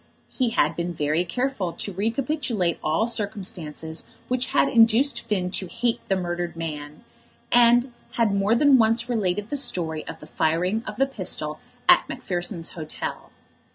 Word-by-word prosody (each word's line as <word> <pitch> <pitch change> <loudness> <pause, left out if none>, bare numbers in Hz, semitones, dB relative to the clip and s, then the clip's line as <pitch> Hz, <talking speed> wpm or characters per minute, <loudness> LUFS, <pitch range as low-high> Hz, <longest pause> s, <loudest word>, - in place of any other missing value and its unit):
He 255 -3 0
had - - +1
been 170 0 -3
very 150 +3 +1
careful 210 -2 -2
to 200 - -5
recapitulate 225 - -1
all 160 +9 +1
circumstances 180 -8 -4 0.2
which 255 0 +1
had - - +3
induced 240 +2 +4
Finn 185 -4 -2
to 185 - -2
hate 235 +7 -1
the 195 - +3
murdered 175 -2 -3
man, 150 -2 -6 0.5
and 240 +1 +5 0.2
had 225 -4 +2
more 200 +3 +2
than 275 +1 +5
once 230 +1 +3
related 210 -3 -1
the 290 - 0
story 160 - 0
of - - -7
the - - -11
firing 180 +8 0
of 210 - -5
the 270 +5 +3
pistol 180 - -3 0.3
at - - +6
Macpherson's 175 -2 -3
Hotel. 155 -3 -6
200 Hz, 155 wpm, -24 LUFS, 170-235 Hz, 0.5 s, at